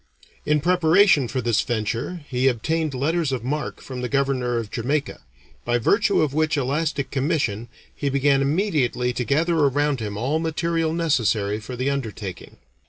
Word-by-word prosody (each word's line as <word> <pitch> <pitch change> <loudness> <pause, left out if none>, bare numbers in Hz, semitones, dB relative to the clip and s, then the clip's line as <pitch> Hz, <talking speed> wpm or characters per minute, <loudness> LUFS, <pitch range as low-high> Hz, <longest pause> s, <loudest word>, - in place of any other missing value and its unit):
In 150 0 +2
preparation 175 -3 +4
for 130 +2 -2
this 115 -2 +2
venture 120 +9 -3
he 130 0 +1
obtained 150 +4 0
letters 155 +3 0
of 125 -4 -3
marque 150 +4 -3
from 130 -2 -7
the 125 - -3
governor 135 -3 0
of 110 -3 -4
Jamaica, 140 +4 -2 0.4
by 120 0 +1
virtue 200 - +2
of 145 -3 -1
which 155 0 +1
elastic 140 +1 -1
commission 135 -6 -1 0.3
he 140 - -2
began 140 0 +2
immediately 140 - 0
to 125 - -2
gather 160 +7 +1
around 145 -1 +2
him 105 -2 -4
all 135 +8 0
material 165 0 -1
necessary 115 -11 +1
for 120 +4 -7
the 130 +3 -1
undertaking. 110 -8 -6
140 Hz, 160 wpm, -23 LUFS, 120-155 Hz, 0.4 s, preparation